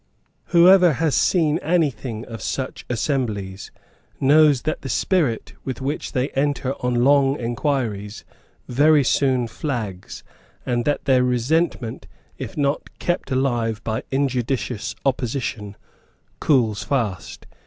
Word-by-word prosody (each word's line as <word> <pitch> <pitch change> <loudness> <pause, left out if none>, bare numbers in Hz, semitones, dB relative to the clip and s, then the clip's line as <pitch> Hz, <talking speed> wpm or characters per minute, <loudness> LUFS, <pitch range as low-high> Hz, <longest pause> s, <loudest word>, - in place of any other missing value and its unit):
Whoever 180 -1 +6
has 150 +2 0
seen 160 -3 +2
anything 140 -9 -1
of 115 -3 -8
such 130 +5 -4
assemblies 110 -7 -2 0.5
knows 145 -1 +5
that 155 - -2
the 135 - -6
spirit 125 - 0
with 130 -3 -5
which 140 +3 -4
they 130 0 0
enter 140 -1 -1
on 120 -1 +1
long 140 0 +4
inquiries 115 -4 -2 0.4
very 145 +3 +4
soon 130 -2 +1
flags, 110 - -5 0.4
and 120 -1 -1
that 145 - -1
their 130 -2 +4
resentment, 125 0 0 0.3
if - - -7
not 140 0 0
kept 175 -5 -2
alive 120 -5 0
by 110 +2 -2
injudicious 130 -4 -1
opposition, 120 -6 -2 0.6
cools 115 -8 +2
fast. 110 -10 -3
130 Hz, 115 wpm, -22 LUFS, 115-145 Hz, 0.6 s, Whoever